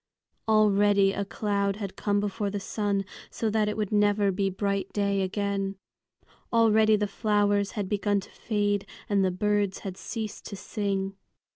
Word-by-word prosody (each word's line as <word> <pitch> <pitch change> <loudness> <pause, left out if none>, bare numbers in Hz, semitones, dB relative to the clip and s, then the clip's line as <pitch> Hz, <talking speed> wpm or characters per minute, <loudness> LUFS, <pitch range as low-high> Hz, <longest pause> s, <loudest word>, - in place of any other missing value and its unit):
Already 205 -2 +4
a 200 - -1
cloud 200 -1 -1
had 200 -2 -6
come 205 -1 0
before 205 0 -2
the 205 +1 -3
sun, 200 0 -1 0.2
so 220 -2 -2
that 210 -1 +2
it 210 - -3
would 210 -3 -2
never 205 -1 +3
be 195 +1 0
bright 200 0 -2
day 200 -1 +1
again. 195 0 -1 0.8
Already 220 -1 +5
the 210 0 +1
flowers 205 0 +1
had 205 -3 -2
begun 205 0 +1
to - - -14
fade 205 -2 -1 0.2
and 200 -2 +2
the 190 - +3
birds 205 +1 0
had 190 -1 -5
ceased 215 -2 -5
to 205 - -6
sing. 195 -1 -3
205 Hz, 160 wpm, -27 LUFS, 195-210 Hz, 0.8 s, Already